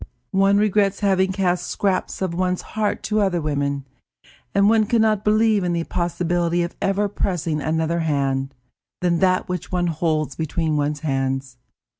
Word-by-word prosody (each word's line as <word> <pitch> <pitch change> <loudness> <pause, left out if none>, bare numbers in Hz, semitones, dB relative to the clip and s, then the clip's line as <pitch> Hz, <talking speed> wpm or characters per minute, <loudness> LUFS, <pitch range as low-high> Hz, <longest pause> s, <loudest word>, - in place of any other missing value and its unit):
One 195 +1 +4
regrets 205 -1 +2
having 190 -2 +2
cast 180 -2 0
scraps 190 -1 -1
of 185 -3 -2
one's 180 +1 -1
heart 210 -1 -1
to 215 0 0
other 190 -3 +1
women, 140 -2 -2 0.7
and 200 0 +3
one 215 -1 +4
can 235 +1 +2
not 215 -2 +1
believe 215 -1 +3
in 175 -1 0
the 170 -1 0
possibility 175 0 0
of 170 - -5
ever 200 +1 +1
pressing 175 -6 -2
another 160 +3 0
hand 140 -3 -1 0.5
than 175 -2 +1
that 185 -1 +2
which 180 -2 -4
one 180 -1 0
holds 155 -3 -1
between 160 0 -1
one's 145 0 -1
hands. 135 -3 -2
175 Hz, 160 wpm, -22 LUFS, 155-195 Hz, 0.7 s, One